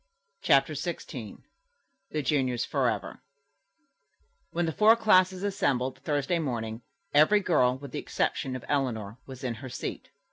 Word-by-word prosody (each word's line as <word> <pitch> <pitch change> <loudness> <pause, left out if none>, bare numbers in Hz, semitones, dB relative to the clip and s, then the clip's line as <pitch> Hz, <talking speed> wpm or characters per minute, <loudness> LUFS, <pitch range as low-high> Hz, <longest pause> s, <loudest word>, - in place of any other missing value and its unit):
CHAPTER - - +4
XVI - - -6 0.7
THE 155 -1 -2
JUNIORS 130 -5 +1
FOREVER - - -1 1.3
When 175 +1 -1
the 165 - -1
four 215 +7 +6
classes 185 -4 +3
assembled 130 -11 0
Thursday 145 +4 0
morning, 115 -6 -3 0.3
every 155 +9 +6
girl, 130 -10 +2
with 140 -1 -10
the - - -3
exception 130 -1 -1
of 130 - -7
Eleanor, 120 -6 -1
was 130 0 -10
in 125 -2 -1
her 130 - -7
seat. - - -6
140 Hz, 135 wpm, -28 LUFS, 125-175 Hz, 1.3 s, four